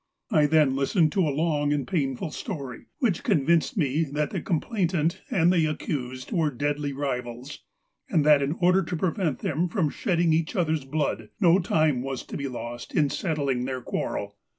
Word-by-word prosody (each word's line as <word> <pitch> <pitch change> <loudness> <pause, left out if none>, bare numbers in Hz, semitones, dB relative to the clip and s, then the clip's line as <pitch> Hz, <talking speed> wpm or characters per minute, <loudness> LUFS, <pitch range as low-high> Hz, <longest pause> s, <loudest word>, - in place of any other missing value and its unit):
1 150 -1 +4
then 150 -3 +3
listened 155 +4 +2
to 190 - +1
a - - +1
long 145 0 0
and 145 -2 -1
painful 150 -3 -1
story, 140 - -6
which 230 - +1
convinced 170 - +2
me 150 -1 +1
that 150 0 -2
the - - -3
complainant 170 -3 0
and 175 0 +3
the 165 -3 +3
accused 130 -4 -4
were 160 -4 +2
deadly 145 +2 -2
rivals, 125 -1 -4 0.5
and 155 -5 +2
that 150 -2 +6
in 140 +2 0
order 180 +2 +3
to 175 -1 -3
prevent 170 -3 0
them 165 +4 0
from 165 -6 0
shedding 170 -6 +1
each 160 +5 0
other's 160 -6 0
blood, 135 -7 -2
no 180 -2 +5
time 155 -7 +2
was 135 -1 -4
to - - -9
be 140 -1 -3
lost 120 -1 -7
in 145 -3 +3
settling 140 -8 -1
their 130 0 -3
quarrel. 100 -4 -4
150 Hz, 175 wpm, -26 LUFS, 135-170 Hz, 0.5 s, that